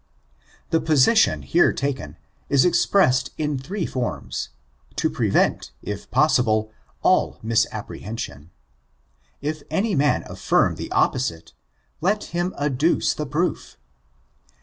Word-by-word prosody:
Thb 160 Hz, -1 st, +2 dB
position 160 Hz, -, +4 dB
here 175 Hz, -, +3 dB
taken, 140 Hz, -1 st, -4 dB, 0.3 s
is 140 Hz, -2 st, +4 dB
expressed 150 Hz, -8 st, +3 dB
in 150 Hz, -3 st, -1 dB
three 180 Hz, +7 st, -4 dB
forms, 90 Hz, -, -4 dB, 0.5 s
to -, -, 0 dB
prevent, -, -, +1 dB
if 105 Hz, -1 st, -6 dB
possible, 120 Hz, -6 st, +2 dB, 0.3 s
all -, -, +3 dB
misapprehension. 110 Hz, -, -3 dB, 0.9 s
If 150 Hz, +1 st, -3 dB
any 210 Hz, +2 st, 0 dB
man 145 Hz, -2 st, +2 dB
affirm -, -, +1 dB
the -, -, -7 dB
opposite, 85 Hz, -11 st, 0 dB, 0.5 s
let 205 Hz, +5 st, +1 dB
him 175 Hz, +2 st, 0 dB
adduce 145 Hz, +3 st, +1 dB
the 150 Hz, -, -4 dB
proof. 160 Hz, +6 st, -2 dB
140 Hz, 105 wpm, -23 LUFS, 115-165 Hz, 0.9 s, position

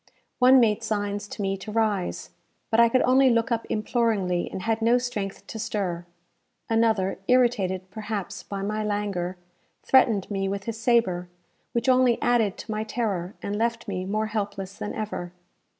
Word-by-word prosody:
One 255 Hz, +1 st, +7 dB
made 215 Hz, -4 st, +3 dB
signs 205 Hz, -1 st, -2 dB
to 205 Hz, -, -5 dB
me 195 Hz, 0 st, 0 dB
to 195 Hz, +3 st, -8 dB
rise, 210 Hz, -4 st, -1 dB, 0.4 s
but 225 Hz, -, +3 dB
I 235 Hz, 0 st, +7 dB
could 255 Hz, +2 st, +3 dB
only 260 Hz, +1 st, +5 dB
look 230 Hz, +1 st, +1 dB
up 230 Hz, -1 st, -1 dB
imploringly, 215 Hz, -5 st, 0 dB
and 190 Hz, -, -5 dB
had 225 Hz, 0 st, 0 dB
no 235 Hz, +2 st, +4 dB
strength 220 Hz, -6 st, -4 dB
to 220 Hz, -, -7 dB
stir. 190 Hz, -5 st, -3 dB, 0.6 s
Another, 220 Hz, -4 st, +1 dB
irritated, 205 Hz, -7 st, +2 dB
perhaps, 210 Hz, -2 st, -5 dB
by 195 Hz, -1 st, -5 dB
my 215 Hz, +1 st, -2 dB
languor, 200 Hz, -4 st, -2 dB, 0.5 s
threatened 225 Hz, -7 st, +3 dB
me 195 Hz, -1 st, -1 dB
with 200 Hz, 0 st, -3 dB
his 225 Hz, +1 st, -5 dB
sabre, 195 Hz, -8 st, +2 dB, 0.4 s
which 235 Hz, +2 st, -1 dB
only 255 Hz, -2 st, +4 dB
added 230 Hz, -5 st, +2 dB
to 220 Hz, -, -7 dB
my 215 Hz, 0 st, -1 dB
terror, 210 Hz, -5 st, -2 dB
and 200 Hz, -, -2 dB
left 230 Hz, +1 st, -1 dB
me 185 Hz, -2 st, -3 dB
more 215 Hz, +3 st, -1 dB
helpless 200 Hz, -3 st, -4 dB
than 205 Hz, -, -5 dB
ever. 190 Hz, -5 st, -4 dB
215 Hz, 165 wpm, -25 LUFS, 195-230 Hz, 0.6 s, One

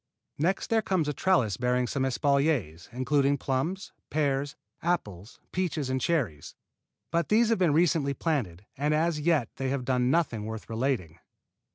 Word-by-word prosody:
Next 185 Hz, +9 st, 0 dB
there 225 Hz, -1 st, +4 dB
comes 185 Hz, -7 st, 0 dB
a 150 Hz, -, 0 dB
trellis 130 Hz, -, +2 dB
bearing 125 Hz, 0 st, +1 dB
some 135 Hz, +2 st, -1 dB
espaliers, 135 Hz, -, 0 dB
including 140 Hz, +3 st, +1 dB
plums, 160 Hz, -, -2 dB, 0.2 s
pears, 140 Hz, -2 st, 0 dB, 0.3 s
apples, 105 Hz, -, -3 dB
peaches 160 Hz, -7 st, -1 dB
and 130 Hz, 0 st, -1 dB
cherries; 120 Hz, -, -1 dB, 0.6 s
but 170 Hz, +1 st, 0 dB
these 225 Hz, +2 st, +4 dB
have 230 Hz, -, +2 dB
been 175 Hz, -4 st, +3 dB
recently 150 Hz, -3 st, +2 dB
planted, 110 Hz, -, -2 dB
and 150 Hz, +2 st, +1 dB
as 160 Hz, 0 st, +1 dB
yet 150 Hz, -6 st, +2 dB
they 135 Hz, -1 st, -2 dB
have 135 Hz, -2 st, -2 dB
done 125 Hz, -1 st, +1 dB
nothing 135 Hz, -9 st, +1 dB
worth 110 Hz, +1 st, -7 dB
relating. 110 Hz, -, -2 dB
140 Hz, 155 wpm, -28 LUFS, 125-165 Hz, 0.6 s, there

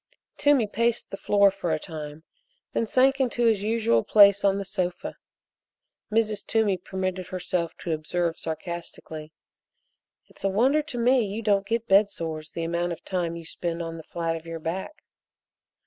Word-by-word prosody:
Toomey 285 Hz, -5 st, +4 dB
paced 230 Hz, +3 st, -1 dB
the -, -, -3 dB
floor 200 Hz, -1 st, +4 dB
for 185 Hz, -3 st, -3 dB
a 155 Hz, -, +2 dB
time, 155 Hz, -1 st, -8 dB, 0.5 s
then 230 Hz, -, 0 dB
sank 265 Hz, +4 st, +3 dB
into 240 Hz, -2 st, +1 dB
his 220 Hz, -3 st, +3 dB
usual 215 Hz, -, +2 dB
place 200 Hz, -1 st, +6 dB
on 195 Hz, -1 st, +3 dB
the 200 Hz, -, -3 dB
sofa. 180 Hz, -3 st, -3 dB, 1.0 s
Mrs. 215 Hz, -2 st, +1 dB
Toomey 220 Hz, -3 st, +2 dB
permitted 185 Hz, 0 st, -4 dB
herself 180 Hz, -2 st, -2 dB
to 170 Hz, -, -3 dB
observe 165 Hz, +2 st, -1 dB
sarcastically: 160 Hz, -1 st, -6 dB, 0.9 s
"It's -, -, -16 dB
a 195 Hz, -, +2 dB
wonder 260 Hz, +10 st, +3 dB
to 295 Hz, -5 st, -7 dB
me 245 Hz, +1 st, +4 dB
you 210 Hz, +2 st, -4 dB
don't 200 Hz, -2 st, +2 dB
get 230 Hz, +1 st, -1 dB
bed 200 Hz, +1 st, +5 dB
sores 160 Hz, -3 st, -5 dB
the 165 Hz, -, -5 dB
amount 170 Hz, +1 st, -1 dB
of 165 Hz, -, -11 dB
time 175 Hz, -3 st, -2 dB
you 170 Hz, -1 st, -8 dB
spend 170 Hz, +1 st, -4 dB
on 165 Hz, 0 st, -6 dB
the 160 Hz, -, -9 dB
flat 165 Hz, -1 st, -2 dB
of 165 Hz, 0 st, -8 dB
your 165 Hz, 0 st, -5 dB
back." 185 Hz, -, -5 dB
190 Hz, 170 wpm, -26 LUFS, 165-220 Hz, 1.0 s, place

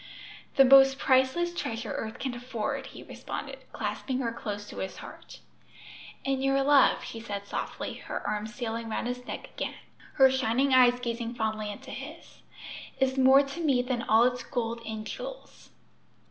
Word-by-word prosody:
"The 270 Hz, -, +7 dB
most 270 Hz, 0 st, +7 dB
priceless 265 Hz, +7 st, +2 dB
treasure 225 Hz, -8 st, -4 dB
earth 220 Hz, 0 st, -4 dB
can 260 Hz, -2 st, -3 dB
afford!" 240 Hz, -2 st, -4 dB
he -, -, -11 dB
responded, -, -, -7 dB
clasping 260 Hz, -2 st, -3 dB
her 230 Hz, -2 st, -1 dB
close 205 Hz, -3 st, -6 dB
to -, -, -10 dB
his 190 Hz, 0 st, -4 dB
heart. -, -, -11 dB, 0.8 s
"And 270 Hz, -1 st, 0 dB
your 270 Hz, 0 st, +2 dB
love," 285 Hz, -1 st, +5 dB
she 225 Hz, -, -7 dB
said 205 Hz, -3 st, -5 dB
softly, -, -, -4 dB
her -, -, -4 dB
arm 210 Hz, 0 st, -2 dB
stealing 230 Hz, -1 st, -5 dB
round 220 Hz, -, -2 dB
his 250 Hz, 0 st, -4 dB
neck -, -, -7 dB
again, -, -, -4 dB, 0.4 s
her 265 Hz, -2 st, +6 dB
shining 260 Hz, +1 st, +1 dB
eyes 250 Hz, -1 st, +6 dB
gazing 235 Hz, -1 st, -4 dB
fondly 215 Hz, -2 st, -2 dB
into 205 Hz, -, -10 dB
his, -, -, -10 dB, 0.6 s
"is 265 Hz, -1 st, +2 dB
more 265 Hz, +1 st, +6 dB
to 275 Hz, +4 st, -7 dB
me 275 Hz, -7 st, +2 dB
than 250 Hz, -2 st, -2 dB
all 225 Hz, -1 st, +4 dB
its 250 Hz, 0 st, +1 dB
gold 235 Hz, -2 st, -3 dB
and 220 Hz, -1 st, -5 dB
jewels." -, -, -8 dB
250 Hz, 165 wpm, -28 LUFS, 225-270 Hz, 0.8 s, The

